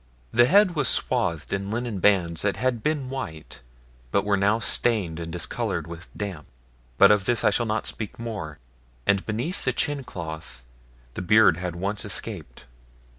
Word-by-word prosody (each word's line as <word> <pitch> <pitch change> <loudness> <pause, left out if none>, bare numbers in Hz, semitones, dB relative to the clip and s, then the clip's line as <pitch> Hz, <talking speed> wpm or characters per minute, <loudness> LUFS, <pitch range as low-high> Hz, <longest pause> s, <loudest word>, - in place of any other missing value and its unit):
The 120 +1 +5
head 195 +2 +5
was 145 -5 +1
swathed 85 +2 +1
in 100 0 -2
linen 115 -2 -3
bands 90 -4 +2
that 100 -1 0
had 120 0 0
been 140 -1 -1
white, 80 - -7 0.5
but 100 +8 +1
were 105 -1 +2
now 100 +3 +2
stained 105 -8 +2
and 85 -1 -6
discoloured 80 0 -2
with 85 +1 -9
damp, 95 -7 -5 0.5
but 100 +1 +8
of 105 -2 +3
this 120 +1 +1
I - - +4
shall 120 - 0
not 110 0 -1
speak 110 -2 -5
more, 105 -10 -6 0.5
and 100 -1 +2
beneath 120 - -2
the 130 - +1
chin 145 +2 -1
cloth 80 - -8 0.5
the - - -5
beard 95 -2 +5
had 90 -1 -4
once 100 +4 -3
escaped. - - -4
100 Hz, 170 wpm, -25 LUFS, 85-120 Hz, 0.5 s, but